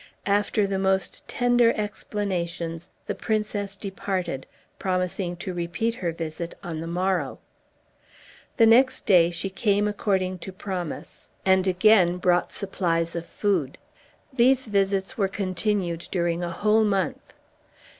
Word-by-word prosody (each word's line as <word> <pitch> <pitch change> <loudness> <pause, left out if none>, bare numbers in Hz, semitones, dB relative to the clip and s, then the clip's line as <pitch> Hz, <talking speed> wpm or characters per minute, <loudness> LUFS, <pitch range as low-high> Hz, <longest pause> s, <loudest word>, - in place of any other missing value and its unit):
After 205 +1 +2
the 195 -1 -1
most 190 -1 0
tender 245 -1 +3
explanations 180 -6 -3 0.2
the - - -2
princess 210 -2 -2
departed, 190 -7 -3 0.3
promising 180 -1 -1
to 180 +2 -5
repeat 175 +7 -1
her 180 -7 -2
visit 165 +1 -6
on 165 -2 -4
the 165 - -5
morrow. 185 +2 -1 1.2
The 230 - +7
next 250 +4 +4
day 175 -5 +6
she 175 +3 -4
came 205 +1 +1
according 190 -3 -1
to 190 - -7
promise, 185 -4 -6 0.2
and 190 0 +4
again 185 -1 +4
brought 180 0 +2
supplies 170 -4 -1
of 170 0 -4
food. 180 -10 -1 0.6
These 260 +1 +4
visits 200 +2 0
were 195 - +3
continued 185 -3 -1
during 175 -1 0
a 175 - -2
whole 215 +5 +2
month. 195 -6 -1
190 Hz, 125 wpm, -25 LUFS, 175-205 Hz, 1.2 s, The